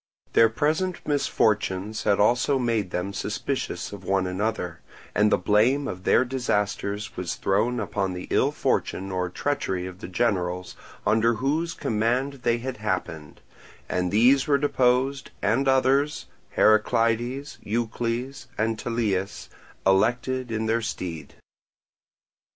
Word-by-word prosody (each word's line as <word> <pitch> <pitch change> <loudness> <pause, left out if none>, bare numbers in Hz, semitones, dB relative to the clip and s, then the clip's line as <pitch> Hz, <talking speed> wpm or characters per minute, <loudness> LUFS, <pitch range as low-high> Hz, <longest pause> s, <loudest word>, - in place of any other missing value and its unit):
Their 115 - +6
present 155 +9 0
misfortunes 110 -7 0
had 100 -1 +3
also 125 +6 +3
made 115 -6 0
them 90 +3 -3
suspicious - - -3
of 100 -2 -9
one 95 0 +1
another; 90 -3 -2 0.3
and 105 +1 +3
the - - +5
blame 110 +9 +2
of 95 0 -6
their 130 - +4
disasters 105 -3 -2
was 90 -2 -3
thrown 110 +6 +1
upon 100 -3 -2
the 90 0 -6
ill - - +3
fortune 95 +1 -1
or 90 -1 -1
treachery 95 -5 -2
of 90 0 -8
the - - -7
generals 90 -3 -1 0.3
under 115 +1 +3
whose 155 +8 -1
command 125 +6 0
they 120 -1 +2
had 125 +2 -5
happened; 90 -7 -4 0.5
and 90 0 -1
these 125 +6 +4
were 145 -1 +4
deposed 135 -1 +1
and 115 +7 +1
others, 135 +2 +2 0.3
Heraclides, 115 +5 +2
Eucles, 120 +3 -2
and 110 0 0
Tellias, 105 -5 -2 0.4
elected 120 +6 +2
in 110 0 -1
their 115 +1 +1
stead. 85 -9 -5
115 Hz, 130 wpm, -25 LUFS, 95-130 Hz, 0.5 s, Their